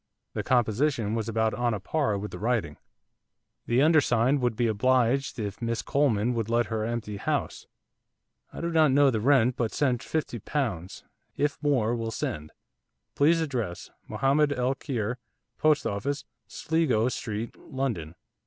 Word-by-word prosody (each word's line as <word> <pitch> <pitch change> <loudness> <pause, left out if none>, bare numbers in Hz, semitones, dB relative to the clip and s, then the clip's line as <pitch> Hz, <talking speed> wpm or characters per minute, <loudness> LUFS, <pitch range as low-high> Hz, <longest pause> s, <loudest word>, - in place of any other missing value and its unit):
The - - -2
composition 120 -1 +1
was 115 0 -2
about 110 0 +1
on 120 -2 0
a - - -4
par 110 - 0
with 105 +1 -5
the - - -7
writing. 105 - -1 0.9
'The 120 +4 +3
undersigned 140 -4 +3
would 120 -2 +1
be 120 +1 +1
oblidged 125 +4 +2
if 105 -2 -5
Miss 115 -1 -2
Coleman 125 -5 +1
would 115 -2 -2
let 120 +1 +2
her 110 -1 -1
empty 110 -2 -3
house. - - -2 0.8
I - - -7
do 170 0 -2
not 160 -2 +4
know 140 +1 +5
the 110 - -1
rent 125 -1 +3
but 115 -3 0
send 130 -4 0
fifty 145 -5 -3
pounds. 100 - -3 0.3
If 145 0 -1
more 125 -6 +2
will 115 -1 -3
send. 75 -8 -4 0.6
Please 165 +4 +3
address, 120 - -3 0.2
Mohamed 145 +2 +2
el 125 0 0
Kheir, 125 -4 -3 0.4
Post 150 -3 +3
Office, 140 +8 -2 0.2
Sligo 130 -4 +1
Street, 115 -2 -4
London. 110 - -4
120 Hz, 155 wpm, -27 LUFS, 110-140 Hz, 0.9 s, know